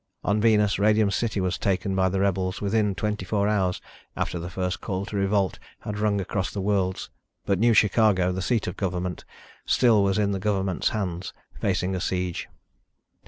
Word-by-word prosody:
On 105 +1 +1
Venus, 105 -3 +3
Radium 105 0 +3
City 110 0 -1
was 95 -1 -1
taken 95 0 0
by 95 0 +2
the 95 +1 -1
rebels 95 0 0
within 105 -1 +1
twenty 105 -1 -2
four 100 +1 0
hours 95 -4 +1 0.4
after 90 - -2
the 85 +2 -5
first 90 0 -3
call 95 -1 -3
to 105 - -7
revolt 100 -1 +1 0.2
had 105 -1 -5
rung 105 -1 +1
across 95 +1 -2
the 100 - -5
worlds, 95 -2 -1 0.3
but 100 -2 +1
New 115 +1 +4
Chicago, 100 -4 +4
the 95 +1 -3
seat 115 +3 0
of 90 - -4
government, 90 -2 -3 0.4
still 115 -5 +4
was 95 -1 +1
in 100 -1 +1
the 100 - -2
government's 95 -2 0
hands, 90 -4 -3 0.3
facing 95 -1 0
a 90 - -2
siege. 90 -1 -2
100 Hz, 180 wpm, -25 LUFS, 95-105 Hz, 0.4 s, New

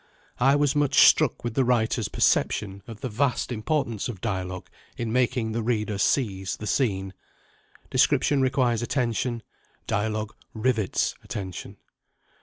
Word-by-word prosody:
I 135 +3 +4
was 145 -1 +2
much 145 -1 +5
struck 155 -6 +4
with 120 -2 -3
the 135 - +2
writer's 115 -3 +1
perception 100 -1 +1
of 115 -2 -10
the - - -2
vast 125 +3 0
importance 120 -2 -1
of 105 -6 -6
dialogue 95 -3 -4 0.3
in 115 -2 -3
making 125 -2 +1
the 115 +1 -2
reader 110 -3 -1
seize 95 -7 0
the 105 - -7
scene. 95 -4 0 0.8
Description 145 -2 +3
requires 130 -3 +1
attention: 120 -1 -1 0.4
dialogue 110 0 -2 0.2
rivets 110 -3 0
attention. 95 -3 -6
115 Hz, 130 wpm, -25 LUFS, 105-130 Hz, 0.8 s, much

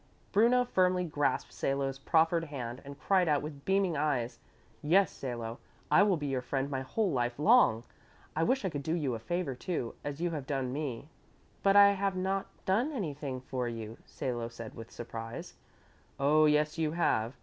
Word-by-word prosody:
Bruno 240 +4 +4
firmly 185 -5 +2
grasped 145 -4 -1
Salo's 135 0 -1
proffered 165 +3 +2
hand 125 -5 -6
and 140 0 -9
cried 185 -3 +2
out 145 -1 +2
with 145 -2 -8
beaming 190 -3 +2
eyes, 125 -6 -1 0.4
"Yes, 175 +4 +4
Salo, 120 -3 -5 0.3
I - - +7
will 200 -3 +4
be 145 - -4
your 135 -2 -1
friend 135 +2 -2
my 135 -1 -1
whole 190 +9 0
life 120 -3 -1
long. 150 - +5 0.5
I 160 - 0
wish 255 +6 +1
I - - +1
could 145 - -3
do 160 +4 -1
you 145 -7 -1
a 115 - -4
favor, 175 +4 -2
too, 125 -2 -3
as 145 0 -5
you 175 0 0
have 145 -5 -5
done 135 -3 -2
me." 140 -3 -4 0.5
"But 195 0 +4
I 200 0 +9
have 195 -1 -1
not 190 +1 -1 0.2
done 225 +11 +2
anything 145 - -4
for 130 -1 -3
you," 115 -1 -7
Salo 120 -3 -4
said 115 -1 -9
with 115 0 -9
surprise. 115 -1 -7 0.7
"Oh, 150 +3 +5
yes, 150 +1 +2
you 155 -1 0
have. 120 -8 +1
145 Hz, 185 wpm, -31 LUFS, 130-180 Hz, 0.7 s, I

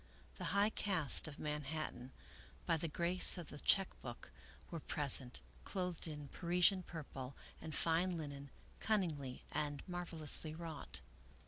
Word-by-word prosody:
The - - -4
high 200 +3 +3
caste 180 -10 +3
of 145 - -7
Man 150 0 -2
hattan, 135 -4 -4 0.5
by 165 - +3
the 165 +1 -1
grace 175 +4 +4
of 175 - -6
the 145 - -7
check 195 +4 +5
book, 120 -2 -7 0.4
were 165 - -3
present, 135 - 0 0.2
clothed 180 -3 +1
in 150 -2 -6
Parisian 180 +4 +3
purple 140 -6 -7 0.3
and 160 -1 -3
fine 170 +2 +3
linen, 140 -2 -6 0.3
cunningly 160 -12 0
and 145 -2 -2
marvelously 165 -3 -2
wrought. 160 - -6
160 Hz, 135 wpm, -39 LUFS, 145-175 Hz, 0.5 s, check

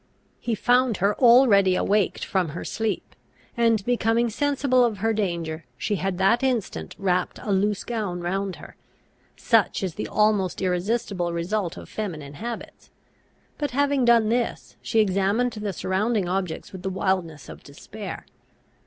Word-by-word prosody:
He 235 - -2
found 245 0 +2
her 200 +3 +2
already 235 -7 +6
awaked 205 +1 +1
from 185 -4 0
her - - -6
sleep; 220 -4 -3 0.4
and, 230 -4 +2
becoming 235 -1 +1
sensible 275 0 +2
of 230 -4 0
her 225 +3 0
danger, 170 -6 -2
she 205 +10 -1
had 190 0 -2
that 195 +6 +3
instant 225 - -2
wrapped 185 -2 0
a 210 - -4
loose 200 +1 +1
gown 210 -7 -3
round 190 +2 -2
her. - - -13 0.6
Such 225 -4 +2
is 185 -3 -2
the 210 - -4
almost 210 -4 +1
irresistible 185 -1 -1
result 175 +1 -2
of - - -9
feminine 155 -10 -5
habits; 235 +10 -7 0.7
but, 290 -1 -1
having 285 -2 +2
done 235 -2 +4
this, 235 0 -2
she 225 - 0
examined 205 +4 +2
the 210 -2 -4
surrounding 195 +2 0
objects 180 -2 -3
with 190 - -8
the 190 - -2
wildness 185 -6 -2
of - - -10
despair. - - -9
205 Hz, 150 wpm, -24 LUFS, 185-230 Hz, 0.7 s, already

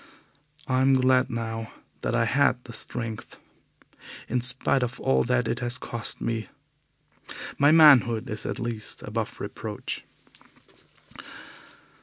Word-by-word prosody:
I 130 0 +1
am 135 0 +4
glad 130 0 +3
now 115 -1 -4 0.3
that 120 - -1
I 115 -1 +2
had 135 0 +2
the 115 - -11
strength. 115 -2 -5 0.9
In 125 - -1
spite 125 +2 +3
of 120 -1 -3
all 65 0 +2
that 60 - +1
is 120 - -2
has 120 0 -2
cost 120 -2 -1
me, 115 -3 -3 1.1
my 145 +1 +6
manhood 135 -8 +6
is 105 0 -5
at - - -3
least 115 -2 -5
above - - -4
reproach. - - -6
120 Hz, 125 wpm, -26 LUFS, 115-130 Hz, 1.1 s, my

